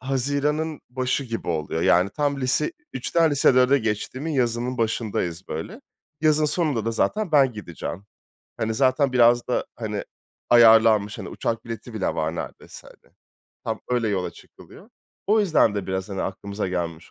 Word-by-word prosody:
haziranın 145 +4 -1
başı 130 +2 -1
gibi 115 -6 -5
oluyor. 80 0 -2
Yani 90 +3 +4
tam 145 0 -1
lise 130 +4 0 0.2
3'ten 160 +6 +1
lise 140 -2 +4
4'e 130 +2 +5
geçtiğimin 130 +7 -3
yazının 125 -1 -1
başındayız 105 -6 -2
böyle. 80 +1 -6 0.4
Yazın 155 0 +3
sonunda 150 - 0
da 115 - 0
zaten 210 - -1
ben 135 -4 +5
gideceğim. 100 -1 -7 0.5
Hani 110 0 -2
zaten 130 +2 +2
biraz 120 -1 +4
da, 125 - 0
hani, 105 -3 -4 0.5
ayarlanmış, 110 -3 +6
hani, 95 -4 -6
uçak 115 +5 -3
bileti 115 0 -8
bile 105 - -2
var 80 +1 -2
neredeyse, - - -8
hani. - - -22 0.5
Tam 110 -1 -3
öyle 120 -2 +1
yola 95 -4 -1
çıkılıyor. - - -16 0.4
O 215 +2 +4
yüzden 160 - +3
de 100 -2 -3
biraz, 95 +1 -3
hani, 95 -1 -3
aklımıza 100 +1 -4
gelmiş 85 -2 -4
115 Hz, 155 wpm, -24 LUFS, 100-140 Hz, 0.5 s, ayarlanmış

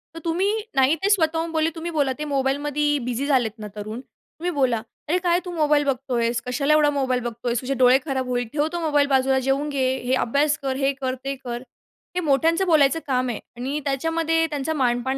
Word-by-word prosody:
तर - - -6
तुम्ही 360 +5 +1 0.2
नाही 270 +3 +4
ते 400 - +3
स्वतःहून 330 -4 +1
बोलले, 320 0 +1
तुम्ही 335 +1 -5
बोला 285 -4 +1
ते 300 - -3
मोबाईलमध्ये 290 +1 0
बिझी 250 +2 -2
झालेत 255 -6 +2
ना 210 - -6
तरुण, 215 +2 -6
तुम्ही 340 +6 -8
बोला, 260 -7 +1 0.3
"अरे, 340 +4 +2
काय 350 -1 +2
तू? 360 - -5
मोबाईल 300 -3 +2
बघतोयेस, 245 -3 0
कशाला 275 +4 +1
एवढा 305 -1 +5
मोबाईल 260 -3 0
बघतोयेस? 235 0 -2
तुझे 265 +1 -2
डोळे 255 0 +5
खराब 265 -3 -2
होईल. 245 -1 -1
ठेव 295 0 +1
तो 345 - -1
मोबाईल. 295 -3 +2
बाजूला 265 -1 +3
जेवून 270 +3 0
घे. 270 -3 0 0.2
हे 250 +1 0
अभ्यास 285 +5 +2
कर, 270 -1 -2
हे 275 +1 +1
कर, 260 -1 -1
ते 275 0 -2
कर." 240 0 -5 0.5
हे - - +1
मोठ्यांचं 325 +6 +2
बोलायचं 310 -2 +4
काम 255 -2 +1
आहे 230 - -3 0.2
आणि 270 +5 -2
त्याच्यामध्ये 325 +4 +1
त्यांचा 295 +1 -2
मानपान 260 -1 0
275 Hz, 200 wpm, -23 LUFS, 255-310 Hz, 0.5 s, एवढा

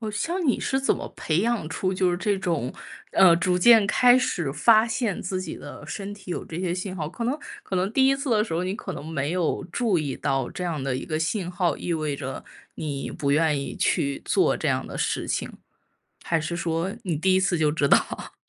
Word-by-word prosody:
哦， 220 - -4
像 340 - -2
你 255 - +2
是 265 - 0
怎 270 - +2
么 - - -6
培 160 +1 0
养 230 -6 0
出 185 +3 -1
就 185 0 +1
是 175 - 0
这 195 +1 0
种， 165 -9 -1 0.4
嗯， 170 -3 +6
逐 180 0 +2
渐 225 +2 +7
开 245 +4 +5
始 170 - 0
发 220 +5 +5
现 225 -3 -1
自 185 -1 -3
己 - - -6
的 - - -10
身 205 0 -5
体 195 -3 -11
有 - - -3
这 170 +2 -6
些 180 -2 -1
信 185 +1 -4
号。 150 -2 -3
可 235 +7 -5
能 260 +5 0 0.3
可 190 - -5
能 185 +3 0
第 265 +2 +4
一 270 - +4
次 275 -2 -3
的 215 -1 +3
时 165 - -4
候， 170 - 0
你 185 +1 -2
可 - - -6
能 - - -7
没 155 -1 -2
有 180 -3 0
注 225 -7 +1
意 145 -4 -2
到 135 -2 -1
这 - - -5
样 165 -5 -2
的 130 -1 -1
一 - - -5
个 155 - -2
信 175 +3 -1
号， 175 -4 0
意 175 - -3
味 155 -3 -1
着 135 -2 -6 0.3
你 140 -3 -4
不 140 -1 -1
愿 150 -1 +2
意 135 - -5
去 140 -1 0
做 - - +2
这 - - -1
样 - - 0
的 - - -7
事 - - -1
情， - - -2 0.7
还 165 -1 +1
是 155 +3 -3
说 170 +2 -1
你 175 -4 -1
第 185 +5 +2
一 190 - +4
次 190 -2 +1
就 155 -2 +2
知 150 -2 +1
道。 - - +1
180 Hz, 255 characters per minute, -25 LUFS, 155-205 Hz, 0.7 s, 渐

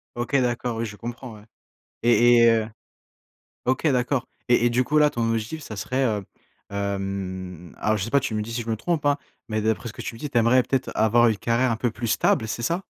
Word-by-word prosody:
OK. 120 +3 -2
D'accord. 120 -1 -1
Oui, 115 - -1
je 105 -2 -7
comprends, 120 +1 -7
ouais. 105 - -14 0.6
Et 120 +1 +5
et 115 0 +7
heu 110 -1 +1 1.0
OK 130 +5 0
d'accord. 125 -1 +1 0.2
Et 120 0 +4
et - - +4
du 125 +2 +2
coup, 150 +4 0
là 150 0 +5
ton 115 -1 -1
objectif 115 +8 -2
ça 110 - -8
serait 130 +7 -1
heu, 105 -4 -1 0.5
hem, 95 -3 -4
alors, 110 0 +1
je 95 - -2
sais 115 - -4
pas, 140 - +4
tu 120 - -3
me 105 - -1
dis 110 +2 -6
si 120 - -2
je 115 - -7
me 110 - +1
trompe, 155 +6 -2
hein, 145 0 +3 0.3
mais 110 0 -1
d'après 110 +2 -1
ce 115 - -7
que - - -8
tu - - -6
me - - -12
dis, 150 - -4
tu 120 - -1
aimerais 120 +2 +4
peut-être 135 0 -1
avoir 115 +2 +4
une 110 -3 +1
carrière 120 +3 +1
un - - +1
peu 120 +1 0
plus 115 +2 -5
stable, 110 0 +2
c'est 115 - -4
ça? 170 +9 -1
115 Hz, 245 wpm, -24 LUFS, 110-125 Hz, 1.0 s, et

